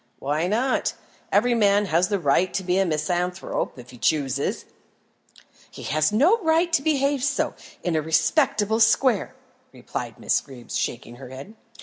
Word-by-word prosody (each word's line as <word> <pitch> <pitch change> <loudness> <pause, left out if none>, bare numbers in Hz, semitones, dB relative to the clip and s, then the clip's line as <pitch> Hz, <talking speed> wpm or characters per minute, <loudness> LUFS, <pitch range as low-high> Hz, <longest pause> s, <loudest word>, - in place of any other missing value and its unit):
"Why 150 +5 -1
not? 240 +7 0 0.4
Every 240 +4 +3
man 205 -2 +3
has 175 0 +2
the 205 -1 0
right 175 +2 +2
to 195 - -1
be 180 +1 +1
a 195 - +2
misanthrope 175 +3 -2
if 125 0 -12
he 125 - -14
chooses." 140 -2 0 1.0
"He - - -11
has 155 +3 +1
no 315 - +4
right 330 0 +2
to 290 - +4
behave 280 -2 +1
so, 285 0 0 0.3
in 175 -2 -1
a 155 - +2
respectable 165 +7 +1
square," 225 0 +3 0.4
replied - - -6
Miss - - +1
Greeb, 125 -3 -13
shaking 120 0 -3
her 130 -1 -10
head. 135 +11 -10
185 Hz, 155 wpm, -24 LUFS, 155-235 Hz, 1.0 s, no